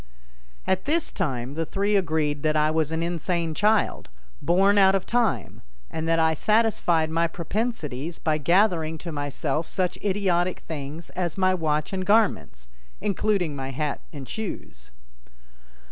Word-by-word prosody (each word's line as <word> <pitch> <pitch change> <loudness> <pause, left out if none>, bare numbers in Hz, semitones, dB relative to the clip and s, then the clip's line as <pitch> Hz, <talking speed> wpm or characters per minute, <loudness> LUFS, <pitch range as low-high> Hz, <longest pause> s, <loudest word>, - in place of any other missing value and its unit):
At 190 0 0
this 320 +3 +1
time 135 - -2
the 165 +2 -1
three 200 +5 0
agreed 155 -6 0
that 155 0 +1
I 155 0 +3
was 160 -1 0
an 160 +1 -1
insane 170 -1 -1
child, 210 - +1 0.3
born 195 +4 +4
out 195 0 +6
of 190 - -1
time, 225 - 0 0.3
and 160 0 -3
that 165 0 +3
I 160 0 +3
satisfied 175 -5 +2
my 165 +1 +2
propensities 170 - -3
by 155 -1 0
gathering 170 -1 +2
to 170 +2 -7
myself 145 +1 -2
such 185 -2 -2
idiotic 185 -3 0
things 155 +1 -7
as 175 -2 -3
my 185 -1 +3
watch 155 -1 -1
and 190 -1 -1
garments, 200 - +1 0.3
including 200 -6 0
my 135 -1 -4
hat 145 +2 -3
and 140 -4 -8
shoes. 175 - -6
170 Hz, 145 wpm, -25 LUFS, 155-195 Hz, 0.3 s, out